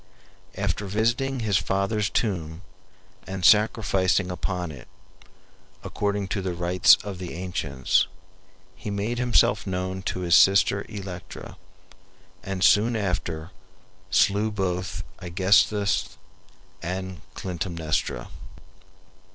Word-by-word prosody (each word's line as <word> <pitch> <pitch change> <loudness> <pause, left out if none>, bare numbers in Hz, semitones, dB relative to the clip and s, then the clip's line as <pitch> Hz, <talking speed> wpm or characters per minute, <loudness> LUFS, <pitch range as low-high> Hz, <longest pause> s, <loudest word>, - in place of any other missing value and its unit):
After 100 - -2
visiting 115 +6 0
his 105 -4 +2
father's 100 +2 0
tomb 85 -5 -2 0.6
and 95 -1 -3
sacrificing 100 -4 +3
upon 90 -1 -3
it, 70 -5 -12 1.0
according 100 -1 -2
to 100 - -1
the 90 -2 -3
rites 90 +1 +5
of 100 -3 -6
the 90 -3 -6
ancients, 80 -7 0 0.7
he - - -7
made 105 +4 -2
himself 120 -3 +3
known 95 0 -3
to 90 - -4
his 85 -2 0
sister 100 +1 +5
Electra, 95 -5 -8 0.9
and 95 -1 -3
soon 115 +3 +5
after 90 -5 -3 0.6
slew 105 +2 +3
both 95 -2 -3 0.2
Aegisthus 100 +3 +2 0.6
and 95 -1 -5
Clytemnestra. 85 -4 -3
95 Hz, 100 wpm, -25 LUFS, 90-105 Hz, 1.0 s, rites